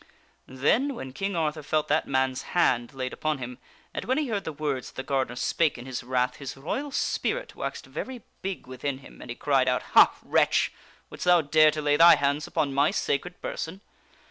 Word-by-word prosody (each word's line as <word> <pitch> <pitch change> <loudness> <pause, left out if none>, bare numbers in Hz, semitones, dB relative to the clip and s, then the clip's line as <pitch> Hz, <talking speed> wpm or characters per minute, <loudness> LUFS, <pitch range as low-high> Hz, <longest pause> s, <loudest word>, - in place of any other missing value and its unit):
Then, 235 - +1
when 130 - -7
King 195 +5 -2
Arthur 155 -1 -1
felt 155 +1 0
that - - +2
man's 130 -1 0 0.2
hand 120 -7 +3
laid 130 -2 -4
upon 155 -1 -1
him, 125 -1 -7 0.3
and - - -3
when 260 +3 +1
he 300 -4 0
heard 205 -3 -2
the 160 - -3
words 145 -3 -3
that - - -21
the 130 - -4
gardener 130 -3 -1
spake 155 +4 +1
in 120 - -9
his 130 -2 -5
wrath, 125 0 0
his 140 -1 -7
royal 265 - -3
spirit - - -2
waxed - - -5
very 255 -3 -6 0.2
big 190 -5 -4
within 130 +2 -4
him 135 - -14
and - - -10
he 120 - -4
cried 135 -2 +2
out: 125 0 +1
" - - -19
Ha, - - +8
wretch! - - +2 0.4
wouldst - - -6
thou 175 -1 +6
dare 155 +1 +5
to 155 0 -3
lay 145 0 +3
thy 170 +1 +9
hands 145 +1 0
upon 140 -2 -1
my 140 +3 +4
sacred 175 +6 -2
person? 185 +5 -5
145 Hz, 210 wpm, -27 LUFS, 130-170 Hz, 0.4 s, thy